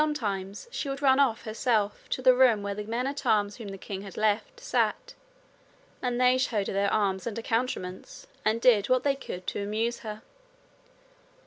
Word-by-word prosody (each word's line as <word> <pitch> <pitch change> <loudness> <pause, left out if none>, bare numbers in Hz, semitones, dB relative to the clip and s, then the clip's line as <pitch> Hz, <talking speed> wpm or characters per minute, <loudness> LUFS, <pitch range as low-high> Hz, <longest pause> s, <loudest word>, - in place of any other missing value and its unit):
Sometimes 205 - -3
she 280 - -3
would 275 +1 -4
run 265 0 +5
off 240 -6 +2
herself 215 -2 -1
to 255 - -2
the 255 -1 +7
room 250 -5 +4
where 200 0 -2
the 210 +1 -5
men 235 +3 -2
at 275 0 -3
arms 205 -4 +2
whom 225 -4 -8
the 195 0 -7
king 195 0 -6
had 195 -1 -10
left 215 - 0
sat, - - -1 0.9
and 245 -1 -1
they 255 0 +4
showed 220 -6 0
her - - -3
their 200 +1 +1
arms 195 -1 0
and 230 - -4
accoutrements 225 -5 -3 0.2
and 220 +2 +2
did 230 -4 +4
what 255 0 +3
they 280 -1 +2
could 185 -9 -7
to - - -3
amuse 220 +4 -1
her. 215 -4 -7
225 Hz, 190 wpm, -28 LUFS, 205-255 Hz, 0.9 s, the